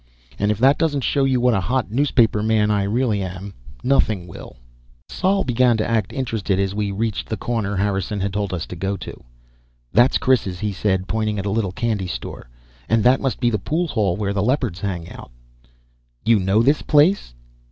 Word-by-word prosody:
And 105 - +1
if 105 - +1
that 135 +5 +4
doesn't 145 -5 0
show 140 +2 +1
you 130 -2 +2
what 125 0 +3
a 100 - +2
hot 125 +3 -1
newspaperman 110 -5 +2
I 100 -1 +1
really 110 -1 0
am, 95 +1 -6 0.3
nothing 110 -8 +1
will. 85 - -11 0.5
Sol 195 +1 0
began 125 -2 +2
to 110 - -1
act 110 -4 0
interested 110 -7 -2
as 100 0 0
we 105 0 -1
reached 105 +2 -3
the 110 - -2
corner 110 -4 -2
Harrison 100 +1 -1
had 100 0 -2
told 100 -1 -2
us 90 -3 -3
to - - -8
go 95 +3 -2
to. - - -9 0.7
"That's 120 +3 +5
Chris's," 105 -8 +1
he 105 -1 -2
said, 95 0 -1
pointing 110 -1 -1
at 100 - -3
a 100 - -1
little 105 -3 0
candy 105 -2 -2
store. - - -7 0.4
"And 115 -1 +3
that 125 +2 +4
must 135 -2 -1
be 120 -1 +2
the 105 - 0
pool 160 - -1
hall 100 -8 0
where 100 -1 -1
the 100 - 0
Leopards 120 - 0
hang 90 -4 -3
out." - - -11 1.0
"You 115 -1 +4
know 95 +4 +2
this 140 +5 +3
place?" 150 - +2
105 Hz, 195 wpm, -21 LUFS, 100-125 Hz, 1.0 s, That's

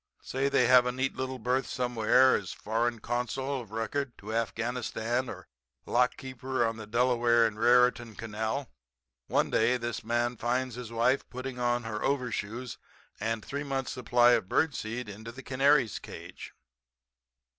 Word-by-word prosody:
Say, 135 +1 -1
they 125 - +3
have 125 0 +6
a - - +1
neat 130 +2 -2
little 130 0 -3
berth 125 +3 0
somewhere 125 +1 +3
as - - -3
foreign 115 +2 -1
consul 125 +4 -2
of 115 - -12
record 120 +4 -3
to 105 +2 -7
Afghanistan 120 +2 -1
or 95 -4 -9 0.4
lockkeeper 130 0 0
on 115 0 -2
the 110 -2 -8
Delaware 120 0 +3
and 110 -1 -2
Raritan 120 -1 +3
Canal. 110 +5 -3 0.6
One - - +1
day 120 +3 +3
this 120 -1 -4
man 120 +1 0
finds 125 +2 -1
his 120 -1 -7
wife 120 +4 +1
putting 130 0 -6
on 120 0 +1
her 110 -1 -4
overshoes 125 -3 -2 0.4
and 110 +1 -2
three 140 +1 -4
months 135 -2 -2
supply 120 -1 +4
of 115 -6 +2
bird 160 -3 +2
seed 115 +1 -4
into 110 +3 -8
the 130 +3 -11
canary's 135 -2 +3
cage. - - -10
120 Hz, 155 wpm, -29 LUFS, 115-130 Hz, 0.6 s, have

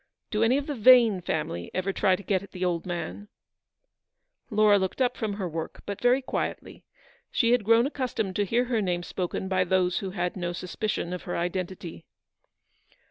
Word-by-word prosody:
Do 215 - 0
any 235 +4 +4
of 285 - -2
the 295 - -3
Vane 230 -5 +6
family 120 - -3
ever 185 +1 -1
try 190 -1 +3
to 200 - -10
get 190 -2 +1
at 200 -1 -13
the 185 0 -2
old 175 0 -1
man? 175 +4 -5 0.6
" - - -48
Eleanor 210 -1 +5
looked 190 +5 -3
up 250 -1 +2
from 215 -3 -2
her 200 -2 -3
work, 160 -1 -6
but 200 -1 -5
very 250 +2 +3
quietly; - - -4 0.5
she 230 -2 +2
had 245 -3 +3
grown 230 +3 +5
accustomed 250 -9 -2
to 205 - +2
hear 235 +5 +1
her 235 -3 0
name 175 -3 -1
spoken 185 +1 -3
by 185 -1 +2
those 185 0 +1
who 195 - -4
had 180 -1 -2
no 175 -2 -3
suspicion 180 0 -3
of 180 - -4
her 175 - -3
identity. 175 -1 -4
195 Hz, 190 wpm, -27 LUFS, 180-230 Hz, 0.6 s, Vane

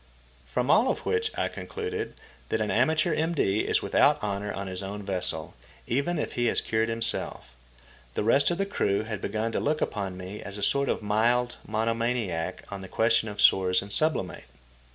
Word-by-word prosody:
From 125 - 0
all 245 - +5
of - - -2
which 450 0 +1
I - - +1
concluded 445 -1 -5 0.3
that - - 0
an - - -1
amateur 155 0 +2
M.D. 155 -11 +1
is - - +1
without - - +3
honour 100 0 -2
on 100 0 -5
his 95 0 -2
own 100 +1 -6
vessel, 95 -2 +4 0.3
even 140 +8 0
if - - -3
he 120 -1 0
has - - +2
cured 110 0 0
himself. 115 - -2 0.6
The - - 0
rest 135 +6 +4
of 175 - -1
the 195 - 0
crew 100 - 0
had 110 -2 -5
begun 110 +1 -2
to - - -1
look 150 +1 0
upon 95 -3 -3
me 95 +3 -7
as 100 0 -7
a 100 - -5
sort 140 +6 +2
of - - -1
mild 120 +4 +1
mono 110 +1 0
maniac 115 -8 -2
on 100 -1 -6
the 95 - -8
question 115 +2 +2
of 105 0 -9
sores 95 -2 +4
and 100 0 -2
sublimate. 155 - 0
110 Hz, 195 wpm, -27 LUFS, 100-140 Hz, 0.6 s, all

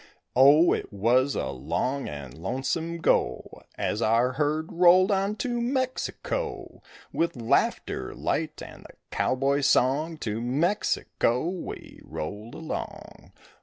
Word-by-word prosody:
Oh, 145 +6 +7
it - - -4
was 120 +7 +2
a - - -2
long 130 - -2
and 70 -4 -8
lonesome 135 - -3
go - - 0 0.2
As 105 - -1
our 115 +3 +3
herd 150 +3 -1
rolled 180 +3 +5
on 200 +1 +1
to 240 0 -2
Mexico; 260 - -3 0.3
With 170 -1 0
laughter 115 -2 0
light - - -2
and - - -11
the - - -15 0.2
cowboy's 135 +2 +1
song 150 +6 +2
To 110 -5 -3
Mexico 135 - 0
we 180 0 -7
rolled 105 +8 -6
along. 160 - -7
140 Hz, 120 wpm, -26 LUFS, 120-175 Hz, 0.3 s, Oh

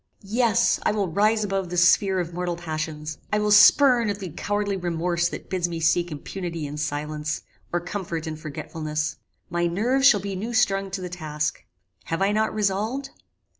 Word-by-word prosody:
Yes, 230 +2 +2
I - - +1
will 200 -4 0
rise 215 +4 +2
above 195 -3 -2
the 180 - -4
sphere 190 +2 +4
of 175 -1 -3
mortal 175 0 -2
passions: 155 -2 -5
I 210 - +2
will 210 0 +1
spurn 240 +2 +7
at 200 - -2
the 190 -3 -6
cowardly 205 +3 -1
remorse 175 -1 0
that - - -8
bids 180 -2 -1
me 165 -1 -4
seek 170 +1 +2
impunity 165 +2 -5
in 145 +1 -6
silence, 150 0 -3 0.3
or 175 - +1
comfort 175 -2 -4
in 160 -1 -4
forgetfulness. 155 0 -4 0.3
My 175 0 +1
nerves 245 +10 +3
shall 210 -7 +6
be 195 0 -4
new 225 +5 -4
strung 195 -4 +2
to 190 0 -4
the 180 - -5
task. 155 -3 -3 0.4
Have 165 +4 -1
I 200 - +3
not 220 +1 +1
resolved? 215 +7 -1
180 Hz, 180 wpm, -24 LUFS, 165-205 Hz, 0.4 s, spurn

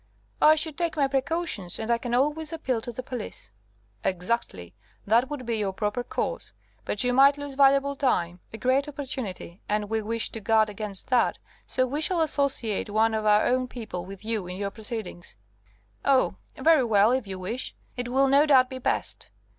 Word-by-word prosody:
"I 310 +1 +7
should 310 -1 +1
take 335 -2 -1
my 280 -2 +3
precautions, 270 - -1
and 225 +1 -2
I 235 - +2
can 240 0 -2
always 300 +5 0
appeal 265 -8 -2
to 240 - -5
the 255 +2 -6
police." 230 - -7 0.5
"Exactly. 180 - -2 0.3
That 235 +5 +3
would 290 -4 -5
be 230 -1 -1
your 195 -2 -1
proper 210 +4 -2
course. - - -3 0.3
But 210 - +1
you 245 0 +1
might 275 +2 +6
lose 285 -1 -6
valuable 275 +1 +4
time, 180 -11 0
a 220 - -7
great 260 +4 +1
opportunity, 255 -11 -6
and 210 0 -1
we 220 0 +1
wish 230 +1 0
to 225 - -5
guard 220 0 +2
against 205 -2 -6
that, 250 -2 +2 0.3
so 255 - +1
we 285 +4 -3
shall 340 +1 +2
associate 275 -10 0
one 220 +2 +2
of 215 -1 -1
our 210 0 +5
own 255 0 +1
people 220 -8 -6
with 195 +2 -10
you 220 -5 -2
in 180 +1 -6
your 200 0 -3
proceedings." 215 - -6 0.7
"Oh! 270 -2 +3 0.2
very 320 -4 +4
well, 215 -1 +4
if 255 -4 0
you 190 -1 -5
wish. 225 +8 -4 0.2
It 245 -1 -4
will, 270 +2 +3
no 280 +3 +5
doubt, 260 -2 +5
be 260 - -5
best." - - -2
245 Hz, 190 wpm, -26 LUFS, 210-275 Hz, 0.7 s, I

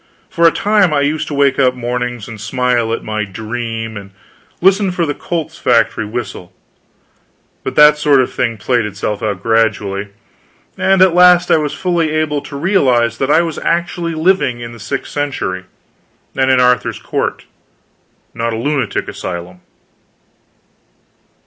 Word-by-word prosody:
For 170 0 +4
a - - +5
time, 205 -6 +2
I 140 - +2
used 150 +2 -1
to 145 - -4
wake 140 -1 +2
up, 130 -2 +3
mornings, 120 -2 -3
and 110 -3 -9
smile 120 0 0
at 115 - -3
my 110 0 -2
"dream," 115 +2 -5
and 100 -1 -9 0.5
listen 195 +2 +3
for 175 -1 -1
the 145 - -2
Colt's 160 +1 -5
factory 115 -3 +2
whistle; 105 -6 -6 1.1
but - - -4
that 150 0 +6
sort 145 -2 +4
of 130 - 0
thing 115 -2 -1
played 120 +1 0
itself 105 0 -4
out, 100 -3 -3
gradually, 105 -3 0 0.7
and 190 -1 +3
at 185 -2 +4
last 180 0 +5
I - - +6
was 150 -2 -2
fully 175 -4 0
able 155 -2 -1
to 140 - -10
realize 125 - +2
that 135 - 0
I 160 +3 +4
was 165 -2 -4
actually 170 0 -1
living 155 -7 +1
in 120 0 -7
the 115 - -12
sixth - - -5
century, 135 -11 -3 0.7
and 130 0 +1
in 130 -1 +4
Arthur's 125 -1 +2
court, - - -3 0.9
not 115 0 -2
a - - -3
lunatic 140 +2 -1
asylum. 90 0 -7
125 Hz, 155 wpm, -16 LUFS, 115-160 Hz, 1.1 s, that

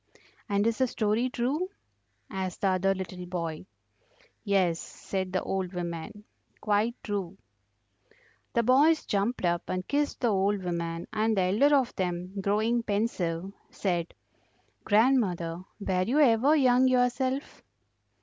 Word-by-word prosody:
"And 200 +1 +1
is 230 +1 0
the 260 - +3
story 225 +2 0
true?" 275 +10 -1 0.6
asked 190 -1 -5
the 195 - +3
other 190 +1 +2
little 185 -1 -6
boy. 170 -1 -4 0.8
"Yes," 185 -5 +2
said 190 -1 -5
the 185 - -1
old 190 -1 -2
woman, 175 +3 -5 0.4
"quite 215 +3 +1
true." 195 -3 -4 1.2
The 235 - +2
boys 290 +7 +4
jumped 205 +1 -1
up 175 0 -1
and 185 0 -3
kissed 290 0 -1
the 240 - +3
old 195 0 +1
woman, 170 -1 -3
and 220 0 +1
the 190 - +3
elder 225 +11 +4
of 260 -3 +1
them, 180 -1 -2
growing 220 +4 +1
pensive, 195 -5 -2 0.2
said: 175 -4 -2 0.7
"Grandmother, 205 -7 +2 0.2
were 190 -3 0
you 240 +9 0
ever 270 +2 +5
young 260 -3 +4
yourself?" 255 +2 0
200 Hz, 130 wpm, -28 LUFS, 185-240 Hz, 1.2 s, ever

